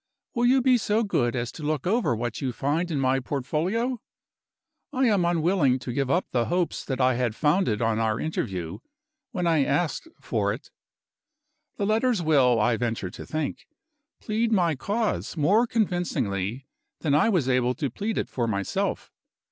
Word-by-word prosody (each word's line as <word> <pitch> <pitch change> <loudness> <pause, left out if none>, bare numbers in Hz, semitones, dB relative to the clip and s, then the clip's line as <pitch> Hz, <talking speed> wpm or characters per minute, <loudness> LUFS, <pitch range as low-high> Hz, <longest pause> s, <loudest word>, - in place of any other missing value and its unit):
Will 240 -1 +2
you 260 0 +4
be 255 -2 +4
so 215 +2 +1
good 120 - 0
as 120 -1 -2
to - - -10
look 150 -2 -2
over 190 - +2
what 120 0 -4
you 130 -2 -1
find 150 +8 -1
in 150 -4 -1
my 135 0 +2
portfolio? 175 - -1 0.9
I 265 -1 +1
am 205 -6 +3
unwilling 170 -5 +2
to 125 -1 -6
give 135 0 -1
up 175 +6 +2
the 120 -2 +1
hopes 175 0 -1
that 130 -2 -3
I 130 0 +4
had 120 -2 -1
founded 150 - +1
on 115 -1 +1
our 110 -1 0
interview, 95 - -3 0.5
when 180 -2 -2
I 160 -4 +3
asked 155 - -1
for - - -1
it. - - -10 1.1
The 205 - 0
letters 225 +2 +2
will, 135 -7 +4
I 115 +2 +2
venture 115 -6 -2
to - - -9
think, 155 -2 -3 0.5
plead 225 +1 -1
my 175 -6 +3
cause 205 - -2
more 205 +11 +3
convincingly 135 - -1 0.4
than 150 -4 +1
I 150 +9 +4
was 175 - +1
able 125 -1 +2
to 140 -6 -2
plead 210 - -3
it - - -1
for 120 -2 -2
myself. 100 -3 -2
150 Hz, 170 wpm, -26 LUFS, 125-200 Hz, 1.1 s, you